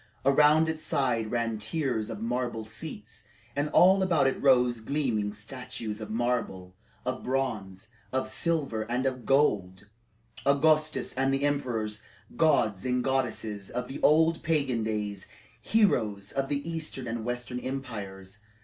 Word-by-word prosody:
Around 150 +3 +5
its 160 -1 -2
sides 120 -8 0
ran 115 -2 -1
tiers 110 -1 -2
of 110 0 -5
marble 120 -1 -2
seats, 110 -2 -9 0.3
and 145 +1 0
all 190 +4 +6
about 170 -7 +3
it 135 - 0
rose 125 -3 +4
gleaming 110 -5 -1
statues 110 0 -6
of 105 - -6
marble, 110 -6 -2 0.3
of 130 0 -2
bronze, 115 -6 -3 0.2
of 130 0 -1
silver, 150 -10 -1
and 125 +2 0
of 130 -2 -2
gold 100 -10 +2 0.6
Augustus 155 0 +2
and 135 +1 +1
the 135 +1 0
emperors, 115 -7 -1 0.3
gods 125 - +2
and 125 -1 0
goddesses 115 -6 -2
of 125 0 -3
the 135 - -7
old 160 +2 +4
pagan 140 -8 0
days, 105 -3 -3 0.3
heroes 110 - +1
of 135 0 -2
the 145 +2 -2
eastern 160 -5 -4
and 115 0 -3
western 120 +1 -3
empires. 105 -8 -6
125 Hz, 140 wpm, -28 LUFS, 110-140 Hz, 0.6 s, all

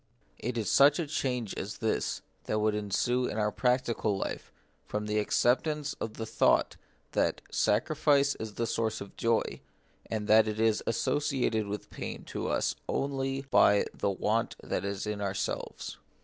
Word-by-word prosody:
It 120 +1 -3
is 110 - 0
such 140 +1 +6
a 170 - -1
change 125 -7 -2
as 105 +3 -5
this 110 - -1 0.2
that 110 - 0
would 110 0 +2
ensue 105 +5 0
in - - -4
our 105 -1 +1
practical 120 -4 +1
life - - -4 0.4
from 105 0 -2
the 105 0 +1
acceptance 140 +7 +1
of 110 - -4
the 110 - -4
thought 110 0 +2 0.4
that - - +1
sacrifice 140 +4 +3
is 110 -2 -6
the 115 - 0
source 115 -1 -1
of 100 - -9
joy, 115 -1 0 0.5
and 110 -2 -2
that 110 0 +6
it 110 0 -3
is 110 -1 +3
associated 120 -3 0
with 105 0 -5
pain - - -6
to - - -2
us - - 0
only 135 -1 -1
by 100 0 +5
the - - -1
want 105 +4 0
that - - -2
is 100 0 -3
in 105 -1 -3
ourselves. 100 -1 -3
110 Hz, 165 wpm, -30 LUFS, 105-130 Hz, 0.5 s, such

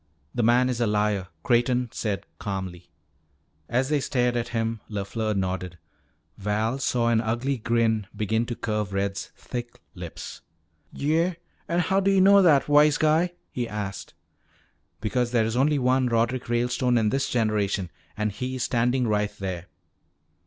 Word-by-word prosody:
"The 120 - 0
man 120 +3 +4
is 125 -2 -1
a 120 - +3
liar," 105 -2 +1 0.2
Creighton 120 0 +2
said 105 -3 -3
calmly. 95 -4 -5 0.8
As 125 +3 +1
they 150 -1 +2
stared 125 -2 0
at 120 -1 -1
him, 115 -1 -2
LeFleur 105 +1 -2
nodded. 95 -2 -2 0.6
Val 110 +5 -1
saw 120 -3 +1
an 115 -1 +3
ugly 120 +4 -1
grin 110 -2 +1
begin 110 +2 0
to 120 - -3
curve 105 -3 -2
Red's 100 0 -2
thick 120 -1 -6
lips. - - -8 0.5
"Yeah? 165 +5 +1 0.3
An 170 +1 +1
how 190 +3 +2
do 195 0 +2
yuh 195 -1 +4
know 200 +1 +7
that, 155 -7 +5
wise 150 0 +5
guy?" 160 +3 +2 0.2
he 120 -2 -3
asked. 100 -3 -5 0.9
"Because 120 +2 0
there 120 -2 +2
is 110 +1 -2
only 145 +4 +3
one 130 0 +2
Roderick 120 +1 0
Ralestone 125 +1 +1
in 110 -2 +2
this 135 +4 0
generation 105 -5 0 0.3
and 105 0 0
he 125 +5 -4
is 125 - -2
standing 125 +1 +1
right 105 -1 0
there. 90 -3 -4
115 Hz, 155 wpm, -25 LUFS, 105-130 Hz, 0.9 s, know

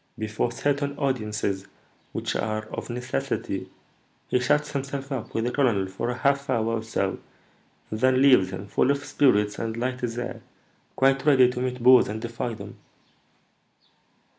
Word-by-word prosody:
Before 110 +2 -1
certain 140 +2 -1
audiences, 105 -8 -1 0.4
which - - -3
are 110 0 -1
of - - -6
necessity, 125 +1 -3 0.6
he 125 - +2
shuts 150 +4 +1
himself 140 0 -4
up 130 -5 -4
with 115 - +1
the 125 - 0
colonel 120 -8 +2
for 95 +5 -4
a 125 - -3
half 140 0 +1
hour 115 -2 +1
or - - -4
so, 115 0 -2 0.7
and 110 - -3
then 130 +1 +4
leaves 130 -9 +6
him, 95 +1 -6
full 100 - +1
of 140 0 0
spirits 105 -7 +2
and 115 0 -3
light 125 +2 -2
as 120 -1 -2
air, 120 0 -4 0.5
quite 135 0 +3
ready 130 -4 +5
to 125 - -5
meet 125 -1 -3
bores 125 0 +7
and 105 +2 -4
defy 115 +1 -4
them." 100 -1 -10
125 Hz, 165 wpm, -25 LUFS, 110-135 Hz, 0.7 s, bores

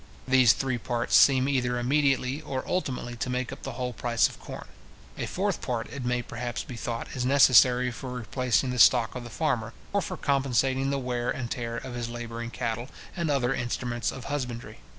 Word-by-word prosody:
These 130 -2 +6
three 130 -3 -2
parts 120 +1 0
seem 130 -1 +6
either 125 -3 +1
immediately 135 +1 +1
or 135 -4 -4
ultimately 125 -8 -2
to 130 +2 -3
make 125 0 -2
up 135 - -11
the - - -5
whole 125 -1 -3
price 115 +1 +2
of - - -12
corn. - - -8 0.5
A - - -3
fourth - - -1
part, 120 -2 -3
it 140 -2 -5
may 125 0 0
perhaps 120 +1 -4
be 125 - -8
thought 115 0 -4
is 125 - -2
necessary 125 -2 +5
for 125 +2 -7
replacing 125 +1 0
the 125 - -3
stock 120 0 +6
of 125 - -6
the 120 - -8
farmer, 120 -5 -1 0.2
or 200 - +2
for - - -5
compensating 135 -1 +1
the 140 - 0
wear 125 -2 -2
and 120 -2 -3
tear 115 -1 -3
of 130 0 -6
his 120 -1 -4
labouring 120 0 -5
cattle, 120 +2 -3 0.3
and 170 -3 -1
other 135 -3 +1
instruments 120 -1 -2
of 130 - -8
husbandry. 125 - -5
125 Hz, 195 wpm, -27 LUFS, 120-135 Hz, 0.5 s, These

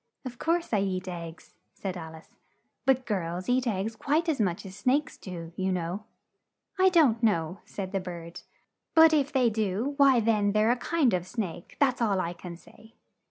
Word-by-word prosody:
"Of 245 -2 -7
course 335 -4 0
I 210 - +4
eat 185 -1 -2
eggs," 170 -2 -8 0.2
said 190 -2 -4
Al 160 -2 -8
ice, 160 - -16 0.5
"but 260 -1 +3
girls 180 -4 -3
eat 250 0 +1
eggs 215 +1 -1
quite 300 +9 0
as 300 -8 +1
much 180 -1 -1
as 190 0 -9
snakes 275 +7 0
do, 170 -3 -8
you 190 0 -1
know." 180 +3 -3 0.7
"I 375 0 +6
don't 290 -11 +4
know," 180 -5 +1
said 190 -2 -6
the 195 - 0
bird, 170 -2 -8 0.5
"but 320 0 +8
if 290 -1 +2
they 255 -5 +3
do, 215 +5 -1
why 275 -4 +6
then 210 -3 +2
they're 215 +2 +3
a - - +3
kind 280 - +1
of 180 0 -1
snake, 185 -6 -5
that's 260 -3 +2
all 205 -5 +2
I 170 -1 -2
can 175 -1 -9
say." 220 +5 -19
210 Hz, 190 wpm, -28 LUFS, 180-255 Hz, 0.7 s, but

